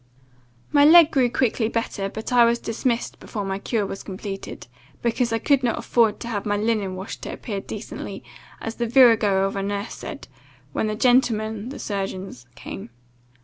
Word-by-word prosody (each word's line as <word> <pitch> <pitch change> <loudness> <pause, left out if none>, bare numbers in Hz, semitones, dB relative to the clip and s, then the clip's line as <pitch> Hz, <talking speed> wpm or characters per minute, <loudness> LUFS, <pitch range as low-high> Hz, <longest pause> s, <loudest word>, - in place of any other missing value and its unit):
"My 285 -1 +5
leg 325 +1 +8
grew 260 -4 +3
quickly 235 -2 +1
better; 215 -4 -2
but 220 +4 -5
I 245 -1 +7
was 235 0 +3
dismissed 235 +1 -2
before 205 -4 -5
my 195 0 -3
cure 215 0 -1
was 195 - -6
completed, 195 0 -7 0.4
because 235 0 +1
I 225 - +2
could 275 +3 +2
not 240 -3 0
afford 225 -3 +2
to - - -5
have 210 -4 -2
my 205 -1 0
linen 210 -3 0
washed 190 +2 -7
to - - -5
appear 200 -5 -5
decently, - - -7 0.4
as 225 0 -6
the 235 - -1
virago 225 -6 +5
of 195 +1 -1
a 195 - -1
nurse 200 +2 -3
said, - - -8 0.5
when 220 - 0
the 215 - -2
gentlemen 220 -2 +2
(the 275 - -7
surgeons) 195 - -5
came. 95 - -8
220 Hz, 180 wpm, -23 LUFS, 200-240 Hz, 0.5 s, leg